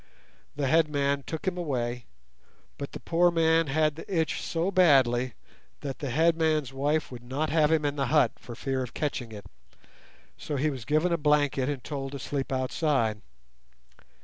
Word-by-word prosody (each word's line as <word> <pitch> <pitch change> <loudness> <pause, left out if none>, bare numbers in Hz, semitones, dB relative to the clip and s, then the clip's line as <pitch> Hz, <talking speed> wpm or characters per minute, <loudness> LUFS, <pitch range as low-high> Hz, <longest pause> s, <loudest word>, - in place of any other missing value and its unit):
The 145 -1 -1
headman 140 -1 +2
took 160 - -5
him 180 -1 -1
away, 125 -6 -2 0.7
but 140 - -6
the - - -6
poor 175 +1 +3
man 165 -1 +3
had 155 +2 +2
the 165 - -10
itch 160 - -2
so 170 +3 -1
badly 130 - +4 0.5
that 140 -2 -5
the 140 - -3
headman's 155 -1 +2
wife 145 +3 0
would 120 -2 -8
not 140 +5 -2
have 155 -1 +3
him 155 -2 +2
in 145 0 -1
the 135 -2 0
hut 150 +2 +4
for 120 - -9
fear 135 +2 -2
of 125 -2 -6
catching 135 -6 -3
it, 105 -2 -9 0.9
so 150 - -4
he 150 +3 +1
was 130 -5 -7
given 155 +4 +2
a - - +2
blanket 145 -3 +2
and 140 -4 -4
told 140 -2 -5
to - - -4
sleep 135 0 -4
outside. 130 -4 0
145 Hz, 175 wpm, -28 LUFS, 130-160 Hz, 0.9 s, badly